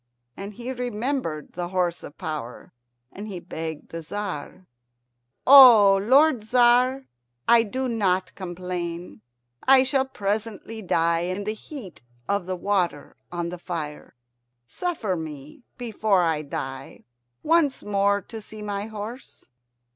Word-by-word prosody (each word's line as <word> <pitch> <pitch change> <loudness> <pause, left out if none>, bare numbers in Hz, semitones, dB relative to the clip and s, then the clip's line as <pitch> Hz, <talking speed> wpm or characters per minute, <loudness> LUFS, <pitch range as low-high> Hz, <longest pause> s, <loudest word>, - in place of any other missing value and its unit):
And 200 +1 -8
he 245 +2 -5
remembered 245 - -3
the 175 0 -3
horse 175 -2 -1
of 145 - -11
power, 155 - -6 0.4
and 205 +2 -8
he 190 -4 -6
begged 160 -2 -6
the 165 - -6
Tzar, 185 -1 -6 0.8
"O 240 -8 +9
lord 265 +3 +4
Tzar, 250 +3 +3 0.4
I 235 -1 +7
do 255 +4 -3
not 190 -6 0
complain. 175 - -5 0.4
I 265 0 +6
shall 265 0 +1
presently 220 -1 -4
die 170 -3 +1
in 185 +4 -3
the 215 +1 -2
heat 220 - -10 0.3
of 200 -3 -1
the 185 - -2
water 180 -6 -1 0.2
on 175 -1 -3
the 180 0 -7
fire. 160 -7 -6 0.5
Suffer 220 - -2
me, 150 - -8 0.2
before 220 -5 +1
I 160 -2 +1
die, 135 -2 -6 0.4
once 315 -4 +2
more 200 0 +1
to 225 +2 -9
see 215 0 -10
my 205 0 -3
horse." 220 - -9
200 Hz, 130 wpm, -25 LUFS, 175-235 Hz, 0.8 s, O